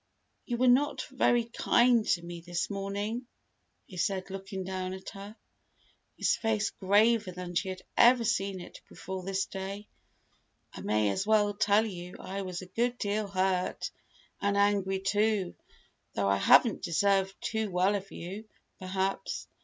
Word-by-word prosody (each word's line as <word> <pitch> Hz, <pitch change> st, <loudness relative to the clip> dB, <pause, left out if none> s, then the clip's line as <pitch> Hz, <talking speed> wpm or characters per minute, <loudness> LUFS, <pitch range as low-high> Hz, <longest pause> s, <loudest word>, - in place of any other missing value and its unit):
"You 240 Hz, -, -1 dB
were 255 Hz, +1 st, +3 dB
not 260 Hz, +1 st, +3 dB
very 240 Hz, -2 st, +3 dB
kind 240 Hz, 0 st, +3 dB
to 170 Hz, -, +1 dB
me 170 Hz, 0 st, -7 dB
this 175 Hz, +3 st, -3 dB
morning," 205 Hz, +5 st, -3 dB, 0.6 s
he 185 Hz, -, -12 dB
said, 190 Hz, +1 st, -1 dB
looking 195 Hz, 0 st, -5 dB
down 185 Hz, 0 st, -4 dB
at 190 Hz, -, -9 dB
her, 200 Hz, +2 st, -10 dB, 0.8 s
his -, -, +2 dB
face 220 Hz, -2 st, 0 dB
graver 205 Hz, +1 st, +3 dB
than 180 Hz, 0 st, -7 dB
she 190 Hz, +2 st, 0 dB
had 185 Hz, 0 st, -6 dB
ever 240 Hz, 0 st, +6 dB
seen 195 Hz, -4 st, 0 dB
it -, -, -11 dB
before 190 Hz, 0 st, -6 dB
this 195 Hz, +1 st, -1 dB
day. 195 Hz, +2 st, -6 dB, 0.9 s
"I -, -, -8 dB
may 105 Hz, -1 st, +1 dB
as 190 Hz, -, -2 dB
well 210 Hz, -1 st, +3 dB
tell 205 Hz, +2 st, +3 dB
you 180 Hz, -4 st, -7 dB
I 195 Hz, +1 st, -5 dB
was 185 Hz, -1 st, -5 dB
a 185 Hz, 0 st, -15 dB
good 245 Hz, +1 st, +1 dB
deal 210 Hz, 0 st, -1 dB
hurt, 185 Hz, -1 st, -1 dB, 0.5 s
and 200 Hz, 0 st, +1 dB
angry, 200 Hz, -1 st, +2 dB
too 205 Hz, -1 st, +1 dB, 0.6 s
though 100 Hz, -1 st, +1 dB
I 100 Hz, -, +3 dB
haven't 220 Hz, -, +5 dB
deserved 195 Hz, +2 st, +1 dB
too 220 Hz, -1 st, -2 dB
well 185 Hz, +2 st, +2 dB
of 195 Hz, -1 st, -4 dB
you, 195 Hz, +6 st, -7 dB, 0.3 s
perhaps. 190 Hz, -, -2 dB
195 Hz, 155 wpm, -30 LUFS, 185-215 Hz, 0.9 s, ever